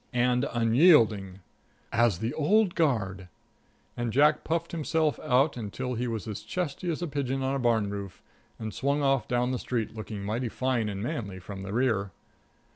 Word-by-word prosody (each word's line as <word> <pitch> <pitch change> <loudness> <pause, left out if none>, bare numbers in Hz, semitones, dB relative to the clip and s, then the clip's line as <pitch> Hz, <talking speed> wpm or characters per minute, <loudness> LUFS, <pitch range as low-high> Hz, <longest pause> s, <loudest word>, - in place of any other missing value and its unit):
"And 125 +2 +2
unyielding." 115 - +4 0.5
"As 115 -5 +3
the 115 +7 -2
old 185 +6 +3
guard." 100 - 0 0.7
And 120 -1 -2
Jack 150 +5 +4
puffed 165 +1 -2
himself 160 -2 0
out 135 +4 +2 0.2
till 125 +3 -3
he 125 +1 -2
was 115 -1 -4
as 105 -1 -5
chesty 170 +8 -3
as 170 +1 -2
a - - -1
pigeon 135 -2 -2
on 135 +1 0
a 140 - -1
barn 115 -4 +2
roof, 100 -2 -6 0.4
and 110 -2 -5
swung 140 +2 0
off 135 -5 +2
down 125 +1 +1
the 125 - -2
street 115 -3 -2
looking 110 -2 -6
mighty 115 +4 -2
fine 125 -3 -1
and 100 0 -4
manly 100 -5 -4
from 95 +1 -8
the 95 0 -6
rear. 110 -4 +1
120 Hz, 175 wpm, -28 LUFS, 105-140 Hz, 0.7 s, unyielding